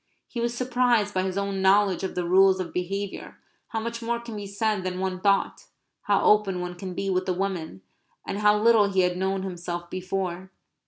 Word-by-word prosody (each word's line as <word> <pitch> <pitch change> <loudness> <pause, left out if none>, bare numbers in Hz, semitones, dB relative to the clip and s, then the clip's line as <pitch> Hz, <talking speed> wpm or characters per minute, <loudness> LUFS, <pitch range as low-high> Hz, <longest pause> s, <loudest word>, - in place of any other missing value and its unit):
He 240 - -6
was 235 0 -1
surprised 245 -4 +2
by 185 - +1
his 190 0 -2
own 200 -1 -2
knowledge 195 -1 +3
of 190 - -3
the 180 - -1
rules 190 +1 +5
of 180 -2 -4
behaviour; 195 +2 -4 0.3
how 225 - -3
much 230 +1 -4
more 235 +1 -1
can 235 -2 -8
be 205 -1 -6
said 200 0 -1
than 185 0 -3
one 185 -1 -2
thought; 200 0 +1 0.4
how - - +2
open 205 -3 +3
one 180 0 -4
can 180 0 -7
be 195 - -3
with 185 0 0
a - - +2
woman; 175 - -4 0.4
and 200 - -3
how 210 0 +4
little 220 -2 +5
he 190 -1 +3
had 180 0 +1
known 190 +1 -1
himself 175 -2 -5
before. 185 0 -3
195 Hz, 205 wpm, -26 LUFS, 185-210 Hz, 0.4 s, rules